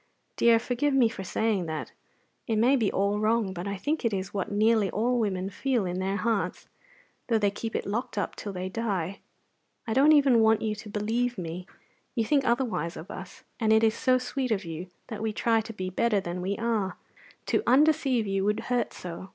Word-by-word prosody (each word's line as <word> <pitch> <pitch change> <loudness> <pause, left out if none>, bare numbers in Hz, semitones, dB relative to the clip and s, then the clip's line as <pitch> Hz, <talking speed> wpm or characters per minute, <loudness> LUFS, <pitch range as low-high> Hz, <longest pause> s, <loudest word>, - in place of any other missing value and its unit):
Dear, 235 -1 +5
forgive 250 +4 0
me 245 -4 +5
for 205 -4 -7
saying 200 -2 0
that; 160 -1 -4 0.6
it 225 - +1
may 240 +6 +4
be 225 -6 +1
all 200 +2 +1
wrong; 215 -2 +1
but 180 +2 -5
I 200 0 -3
think 295 +10 -2
it 230 - +1
is 190 -1 -3
what 195 -1 -2
nearly 215 0 +3
all 245 +3 +1
women 195 -3 -1
feel 250 -2 0
in 180 0 -3
their 190 +1 -1
hearts, 225 -1 -1 0.6
though 230 - +3
they 205 -2 +2
keep 225 +2 -5
it - - -1
locked 215 +2 -3
up 200 - -2
till 205 - -6
they 185 -1 -4
die. 195 -3 -2 0.7
I 225 - -2
don't 275 +5 +6
even 275 -5 +5
want 220 0 +4
you 215 -1 0
to 210 0 -9
believe 225 +4 -1
me. 180 +1 -5 0.5
You 230 -3 +1
think 280 +3 +2
otherwise 230 -9 0
of 160 - -9
us, - - -9 0.2
and 220 -2 +2
it 220 +1 +5
is 220 -1 +4
so 255 +2 +2
sweet 255 +1 -3
of 210 -4 -1
you 165 +2 -6 0.2
that 220 -3 -7
we 220 -1 0
try 225 +1 +2
to 220 - -8
be 185 -3 -5
better 215 +2 +2
than 180 -1 -4
we 195 +2 -2
are 225 -5 -1 0.5
to - - +1
undeceive 265 -3 +4
you 195 -1 0
would 210 +2 +1
hurt 245 -1 0
so. 180 +2 -8
220 Hz, 210 wpm, -27 LUFS, 195-235 Hz, 0.7 s, don't